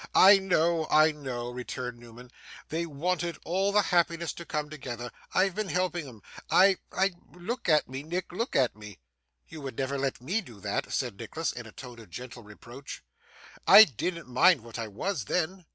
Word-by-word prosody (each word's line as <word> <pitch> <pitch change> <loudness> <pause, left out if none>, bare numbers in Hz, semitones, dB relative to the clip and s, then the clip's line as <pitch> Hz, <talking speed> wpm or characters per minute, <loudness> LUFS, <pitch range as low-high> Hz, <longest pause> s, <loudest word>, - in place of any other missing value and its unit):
'I 195 +1 +8
know, 170 -4 +1
I 155 +1 +5
know!' 125 -5 -5
returned 125 -1 -6
Newman. 120 +1 -14 0.4
'They 170 +2 -2
wanted 170 +2 -2
all 190 +4 +1
the 210 0 +4
happiness 170 -2 +1
to 170 - -9
come 150 0 -2
together. 120 -5 -7 0.2
I've 190 0 +2
been 215 +2 -3
helping 175 -4 -1
'em. 110 -6 -13 0.3
I 190 +1 +5
I 195 +1 +1 0.2
look 200 +6 -4
at 155 -2 +4
me, 130 +1 -6
Nick, 175 +5 -4
look 230 +8 -3
at 125 -6 +2
me!' 105 -3 -11 0.5
'You 155 - -10
would 135 -4 -7
never 135 +1 -2
let 135 -1 -2
ME 180 - -1
do 120 - -14
that,' - - -3
said 120 -6 -2
Nicholas 140 +9 -3
in 120 -2 -8
a - - -12
tone 125 -1 -11
of 110 -4 -14
gentle 120 +5 -9
reproach. 120 +5 -11 0.6
'I 215 - +11
didn't 170 - -3
mind 155 +4 +4
what 115 +1 -9
I 115 - -3
was, 125 - -3
then. 180 - -2
150 Hz, 185 wpm, -28 LUFS, 120-180 Hz, 0.6 s, I